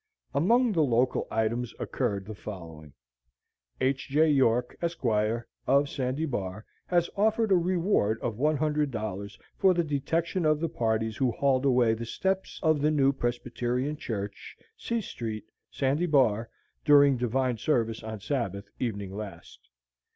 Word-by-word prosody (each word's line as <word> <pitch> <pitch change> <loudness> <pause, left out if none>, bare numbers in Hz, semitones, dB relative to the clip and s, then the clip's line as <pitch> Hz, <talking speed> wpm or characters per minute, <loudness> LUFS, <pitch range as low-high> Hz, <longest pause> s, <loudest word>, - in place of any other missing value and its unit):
Among 230 - +3
the 170 -6 +2
local 125 -2 +2
items 115 +2 -1
occurred 100 -1 -2
the 110 - -7
following: 85 -7 -9 0.9
"H. 135 0 0
J. 155 +3 +4
York, 125 -3 +2
Esq., 170 -5 -3 0.6
of 140 +2 +4
Sandy 130 +4 -2
Bar, 105 -6 -4 0.2
has 175 -1 +2
offered 220 +1 +2
a - - +7
reward 175 - +1
of 115 -3 -3
$100 140 -9 -1 0.2
for 190 -2 +5
the 170 - +2
detection 160 +5 -1
of 155 -1 +3
the 165 0 -1
parties 110 -3 -1
who 130 -2 +2
hauled 135 +1 +1
away 125 -4 +4
the 115 +1 -5
steps 190 +8 -2
of 155 -3 +3
the 150 - +3
new 140 -3 +3
Presbyterian 125 +2 -2
Church, 100 -8 -6 0.2
C 235 - -2
Street, 110 - -5 0.2
Sandy 140 +6 0
Bar, 120 -7 +3 0.3
during 145 -2 +6
divine 125 0 0
service 115 -6 0
on 110 -1 -6
Sabbath 105 -6 -3
evening 100 -5 -3
last. 100 -5 -9
130 Hz, 140 wpm, -28 LUFS, 110-155 Hz, 0.9 s, a